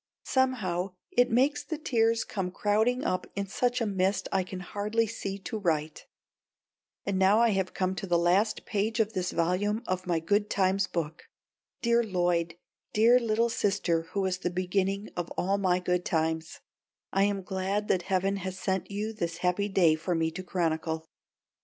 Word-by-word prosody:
Somehow 195 Hz, -9 st, 0 dB, 0.2 s
it 245 Hz, 0 st, +4 dB
makes 265 Hz, +5 st, +2 dB
the 315 Hz, -, -4 dB
tears 230 Hz, -6 st, +2 dB
come 190 Hz, -3 st, -3 dB
crowding 220 Hz, +7 st, +1 dB
up 185 Hz, -, -1 dB
in 200 Hz, 0 st, -1 dB
such 245 Hz, +5 st, 0 dB
a -, -, +2 dB
mist 195 Hz, -1 st, 0 dB
I 195 Hz, -, +2 dB
can 185 Hz, 0 st, -6 dB
hardly 210 Hz, +5 st, -1 dB
see 200 Hz, -3 st, -4 dB
to 215 Hz, +3 st, -5 dB
write. 155 Hz, -5 st, -1 dB, 1.0 s
And 195 Hz, -1 st, 0 dB
now 190 Hz, +2 st, +5 dB
I 235 Hz, 0 st, +5 dB
have 190 Hz, -3 st, -1 dB
come 185 Hz, 0 st, 0 dB
to 195 Hz, -, -4 dB
the 175 Hz, -1 st, +3 dB
last 185 Hz, +6 st, +2 dB
page 215 Hz, +3 st, -1 dB
of 220 Hz, 0 st, +1 dB
this 185 Hz, -2 st, -1 dB
volume 195 Hz, +6 st, 0 dB
of 185 Hz, 0 st, -2 dB
my 175 Hz, -2 st, +2 dB
Good 205 Hz, +6 st, +1 dB
times 190 Hz, 0 st, +2 dB
book. 165 Hz, -1 st, -4 dB, 0.6 s
Dear 235 Hz, 0 st, +4 dB
Lloyd, 175 Hz, -4 st, 0 dB, 0.4 s
dear 230 Hz, +4 st, +6 dB
little 230 Hz, 0 st, +1 dB
sister 195 Hz, -6 st, +1 dB
who 200 Hz, -, 0 dB
was 185 Hz, -1 st, -1 dB
the 180 Hz, -, -1 dB
beginning 190 Hz, +3 st, -1 dB
of 175 Hz, -1 st, -3 dB
all 195 Hz, +2 st, +1 dB
my 185 Hz, -2 st, +2 dB
good 180 Hz, 0 st, 0 dB
times, 160 Hz, 0 st, -1 dB, 0.5 s
I 195 Hz, +1 st, +4 dB
am 200 Hz, -1 st, -1 dB
glad 195 Hz, +2 st, -2 dB
that 185 Hz, -, +3 dB
heaven 195 Hz, +2 st, 0 dB
has 190 Hz, -1 st, -5 dB
sent 190 Hz, -1 st, -2 dB
you 210 Hz, +2 st, -3 dB
this 170 Hz, -6 st, -3 dB
happy 200 Hz, +3 st, +1 dB
day 180 Hz, -5 st, +4 dB
for 165 Hz, +3 st, -1 dB
me 160 Hz, 0 st, +1 dB
to 185 Hz, -, -6 dB
chronicle! 160 Hz, -3 st, -1 dB
190 Hz, 180 wpm, -29 LUFS, 180-210 Hz, 1.0 s, dear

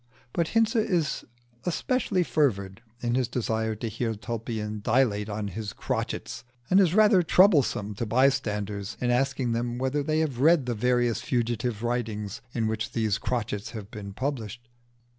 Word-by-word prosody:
But 170 Hz, -2 st, +1 dB
Hinze 225 Hz, +1 st, +3 dB
is 180 Hz, -9 st, 0 dB, 0.4 s
especially 190 Hz, -, 0 dB
fervid 110 Hz, -, 0 dB, 0.2 s
in 120 Hz, -1 st, 0 dB
his 125 Hz, -1 st, +1 dB
desire 110 Hz, -2 st, -1 dB
to 110 Hz, +2 st, -4 dB
hear 115 Hz, +1 st, -2 dB
Tulpian 110 Hz, 0 st, -4 dB
dilate 110 Hz, -2 st, +2 dB
on 105 Hz, 0 st, -3 dB
his 105 Hz, +2 st, -5 dB
crotchets, -, -, -3 dB, 0.3 s
and 190 Hz, -, +7 dB
is 185 Hz, -2 st, +4 dB
rather 210 Hz, -3 st, +6 dB
troublesome 155 Hz, -, +4 dB
to 110 Hz, +3 st, -4 dB
bystanders 105 Hz, -5 st, 0 dB
in 125 Hz, -1 st, +1 dB
asking 130 Hz, -1 st, +1 dB
them 120 Hz, +1 st, -1 dB
whether 130 Hz, +3 st, 0 dB
they 155 Hz, +2 st, 0 dB
have 140 Hz, -6 st, -2 dB
read 155 Hz, 0 st, +5 dB
the 125 Hz, -, -1 dB
various 120 Hz, 0 st, +1 dB
fugitive 120 Hz, -2 st, -1 dB
writings 110 Hz, -4 st, -2 dB
in 115 Hz, -3 st, -1 dB
which 110 Hz, 0 st, -2 dB
these 110 Hz, -2 st, 0 dB
crotchets 105 Hz, -5 st, -2 dB
have 105 Hz, -2 st, -8 dB
been 105 Hz, -3 st, -7 dB
published. 120 Hz, -2 st, -4 dB
120 Hz, 155 wpm, -27 LUFS, 110-135 Hz, 0.4 s, and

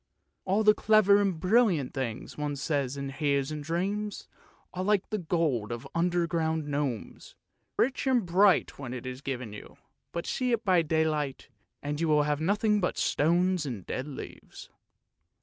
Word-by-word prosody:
All 200 Hz, +3 st, +2 dB
the 210 Hz, 0 st, +7 dB
clever 205 Hz, -2 st, +4 dB
and 190 Hz, -5 st, 0 dB
brilliant 185 Hz, -, +2 dB
things 125 Hz, -5 st, -4 dB
one 150 Hz, -1 st, -3 dB
says 140 Hz, -1 st, -1 dB
and 140 Hz, 0 st, -4 dB
hears 140 Hz, 0 st, 0 dB
in 150 Hz, -1 st, -4 dB
dreams 195 Hz, +7 st, -3 dB, 0.5 s
are 185 Hz, -, -3 dB
like 205 Hz, 0 st, +1 dB
the 215 Hz, -, -1 dB
gold 155 Hz, -, 0 dB
of 120 Hz, 0 st, -5 dB
the -, -, -11 dB
under 175 Hz, 0 st, +1 dB
ground 160 Hz, -2 st, -1 dB
gnomes; 140 Hz, -6 st, -4 dB, 0.4 s
rich 265 Hz, +2 st, +1 dB
and 250 Hz, -6 st, +3 dB
bright 185 Hz, 0 st, +3 dB
when 130 Hz, -2 st, -5 dB
it 125 Hz, -, -7 dB
is 130 Hz, +1 st, -6 dB
given 125 Hz, -6 st, -5 dB
you, 105 Hz, -, -11 dB, 0.3 s
but 170 Hz, -, -4 dB
see 250 Hz, -2 st, 0 dB
it 230 Hz, -1 st, -1 dB
by 185 Hz, -3 st, +4 dB
daylight, 155 Hz, -4 st, -1 dB, 0.3 s
and 145 Hz, +2 st, -3 dB
you 155 Hz, -2 st, +3 dB
have 150 Hz, 0 st, -1 dB
nothing 210 Hz, +4 st, +2 dB
but 180 Hz, -, -1 dB
stones 175 Hz, +3 st, +2 dB
and 110 Hz, -9 st, -6 dB
dead 130 Hz, -, -4 dB
leaves. 145 Hz, -, -10 dB
160 Hz, 165 wpm, -28 LUFS, 140-190 Hz, 0.5 s, the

